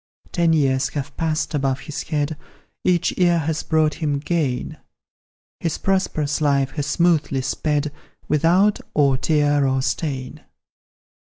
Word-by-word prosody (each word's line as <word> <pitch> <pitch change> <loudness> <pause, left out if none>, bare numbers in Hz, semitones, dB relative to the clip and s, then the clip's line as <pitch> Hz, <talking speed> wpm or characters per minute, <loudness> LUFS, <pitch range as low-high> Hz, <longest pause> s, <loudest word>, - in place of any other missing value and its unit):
Ten 170 -2 +2
years 135 -3 +2
have 145 -1 -4
passed 160 -1 -1
above 135 -2 0
his 145 +1 -5
head, 150 0 -2 0.5
Each 180 -2 +1
year 175 -1 +4
has 160 -1 -1
brought 155 -1 +2
him 150 -3 -1
gain; 140 -5 -2 0.8
His 165 -2 -2
prosperous 160 -7 0
life 140 -2 +2
has 145 0 -3
smoothly 150 -4 +2
sped, 150 +2 -1 0.4
Without 175 +7 +3 0.2
or 140 -3 +4
tear 145 0 +2
or 130 0 0
stain. 135 -3 -3
150 Hz, 130 wpm, -22 LUFS, 140-160 Hz, 0.8 s, year